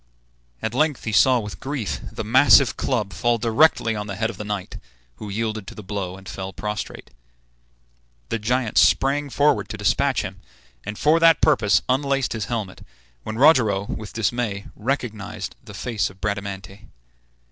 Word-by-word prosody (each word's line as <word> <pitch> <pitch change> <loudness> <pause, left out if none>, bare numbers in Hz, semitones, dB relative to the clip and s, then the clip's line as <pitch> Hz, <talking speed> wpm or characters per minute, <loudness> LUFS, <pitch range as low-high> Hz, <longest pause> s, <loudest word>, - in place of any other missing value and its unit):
At 110 - -2
length 150 +1 +1
he 110 - -3
saw 125 +5 +5
with 105 -2 -7
grief 135 -7 -3
the - - -5
massive 130 +4 +5
club 105 -8 -1
fall 120 +6 +1
directly 115 0 +3
on 105 0 -4
the 100 - -5
head 115 +3 -1
of 100 - -13
the 105 - -5
knight, 105 -3 -5 0.4
who 105 - -8
yielded 110 -1 -3
to - - -9
the 105 - -9
blow, 95 -2 -4
and 95 -1 -14
fell 95 +1 -6
prostrate. 105 +2 -5 1.2
The 115 - -1
giant 120 +1 +1
sprang 140 +2 +3
forward 145 +3 +2
to - - -5
despatch - - +1
him, - - -8 0.4
and 105 +1 -6
for 155 +2 +3
that 165 -2 +6
purpose 105 -3 +3
unlaced 135 0 0
his 110 -3 -3
helmet, 110 -6 -4 0.4
when 110 0 -6
Rogero, 120 -9 +4
with 105 -1 -6
dismay, 110 -2 -2
recognized 105 -5 -4
the 105 -4 -11
face 100 0 -2
of 95 0 -17
Bradamante. 100 -1 -5
110 Hz, 165 wpm, -23 LUFS, 100-130 Hz, 1.2 s, that